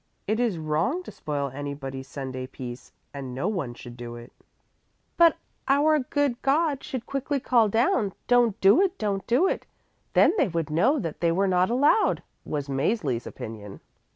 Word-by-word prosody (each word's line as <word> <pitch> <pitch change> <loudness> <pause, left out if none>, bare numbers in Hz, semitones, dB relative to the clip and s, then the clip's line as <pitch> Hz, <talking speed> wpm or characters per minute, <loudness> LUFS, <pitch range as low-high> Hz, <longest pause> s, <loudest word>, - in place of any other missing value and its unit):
It 215 +3 0
is 235 -7 +1
wrong 160 - -1
to - - -9
spoil 145 -2 -3
anybody's 135 -1 -6
Sunday 130 -2 -5
peace 125 -2 -9 0.2
and 135 -3 -6
no 135 +8 -1
one 170 - -2
should 120 0 -10
do 120 -1 -7
it." 120 0 -12 0.8
"But 335 -1 +5 0.3
our 295 +3 +4
good 275 -2 -1
God 285 0 +1
should 260 -5 -5
quickly 275 +1 -2
call 235 -4 +3
down, 220 -2 +1
'Don't 240 -3 +3
do 200 - +6
it, 390 -1 +1
don't 200 -2 -2
do 260 +11 +3
it!' - - -2 0.5
Then - - +5
they 285 - +4
would 165 -3 -3
know 215 - +3
that 165 - -4
they 170 -1 +3
were 195 +4 +2
not 185 0 +2
allowed," 285 - +3 0.2
was 145 -2 -3
Mäzli's 140 - -1
opinion. 105 -3 -8
190 Hz, 170 wpm, -26 LUFS, -, 0.8 s, do